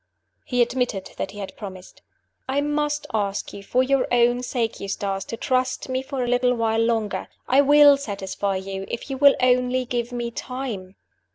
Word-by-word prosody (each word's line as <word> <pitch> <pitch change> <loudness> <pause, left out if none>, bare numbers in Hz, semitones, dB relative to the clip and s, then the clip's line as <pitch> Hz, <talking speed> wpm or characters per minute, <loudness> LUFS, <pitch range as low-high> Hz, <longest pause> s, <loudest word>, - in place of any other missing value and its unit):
He 245 -1 +3
admitted 240 -5 -2
that - - -3
he 205 - -11
had 195 -2 -6
promised. 190 -3 -10 0.5
"I 270 +2 +1
must 295 0 -1
ask 200 -2 -2
you, 200 - -8
for 250 +6 +1
your 270 0 +2
own 245 0 +3
sake, 240 -3 -2
Eustace, 195 0 -3
to 230 - -6
trust 255 +1 -1
me 260 0 0
for 265 -1 -3
a - - -2
little 250 0 +2
while 225 -1 +1
longer. 225 -3 -1 0.2
I 265 +2 +5
will 290 0 +7
satisfy 200 -5 -3
you, 190 0 -4
if 235 - -5
you 265 - -2
will 280 0 +7
only 250 0 +2
give 240 -1 -2
me 240 -1 -3
time." 230 -7 -5
245 Hz, 180 wpm, -23 LUFS, 205-260 Hz, 0.5 s, will